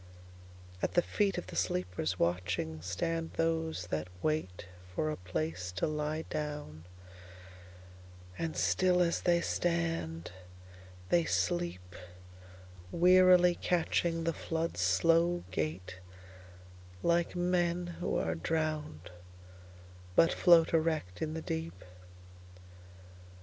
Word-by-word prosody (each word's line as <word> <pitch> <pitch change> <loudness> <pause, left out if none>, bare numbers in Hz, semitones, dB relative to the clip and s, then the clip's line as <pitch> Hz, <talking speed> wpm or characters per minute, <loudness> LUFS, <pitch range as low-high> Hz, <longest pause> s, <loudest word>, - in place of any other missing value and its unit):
At - - -2
the 175 - +5
feet 200 -2 0
of - - -4
the 90 - -9
sleepers, 90 -1 -1
watching, 85 -2 -1
Stand 165 - -3
those 160 - -1
that 80 +1 -2 0.2
waitFor 90 - -3
a - - -4
place 90 0 -4
to - - -1
lie 155 +1 -2
down; 150 - -5 1.5
and 160 - -4
still 180 -1 +3
as 170 -1 0
they 170 -1 +3
stand, 165 - -1 0.8
they 170 -1 +3
sleep, 90 -1 -1 1.0
Wearily 180 - +6
catchingThe 165 -1 0
flood's 165 - -3
slow 165 - +3
gaitLike 90 - -4
men 175 0 +1
who - - -1
are 80 - 0
drowned, 150 - -3 1.0
but 165 - +5
float 170 -2 +5
erect 160 - 0
in 155 0 -2
the 160 - -5
deep. 85 +3 -5
150 Hz, 95 wpm, -32 LUFS, -, 1.5 s, Wearily